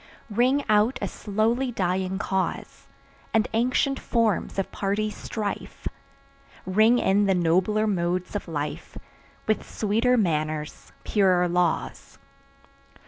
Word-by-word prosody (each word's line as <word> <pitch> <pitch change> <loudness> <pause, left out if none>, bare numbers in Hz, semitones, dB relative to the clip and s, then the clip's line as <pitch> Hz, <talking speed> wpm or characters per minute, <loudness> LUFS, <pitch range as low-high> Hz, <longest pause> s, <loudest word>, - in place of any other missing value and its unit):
Ring 255 +6 +2
out 215 +3 +3
a - - -2
slowly 230 +5 -1
dying 185 -2 -1
cause, 190 -1 -3 0.5
And 220 0 +3
ancient 255 +4 +1
forms 230 -5 0
of 195 - -2
party 210 +2 -1
strife; 210 -1 -5 0.8
Ring 215 +6 +4
in 205 -2 +3
the 195 - +3
nobler 185 +5 +2
modes 180 -2 -1
of 205 - -3
life, 150 -2 -5 0.5
With 215 - 0
sweeter 225 +4 +1
manners, 155 -6 -2
purer 185 -4 +3
laws. 175 -1 -1
205 Hz, 110 wpm, -25 LUFS, 180-225 Hz, 0.8 s, Ring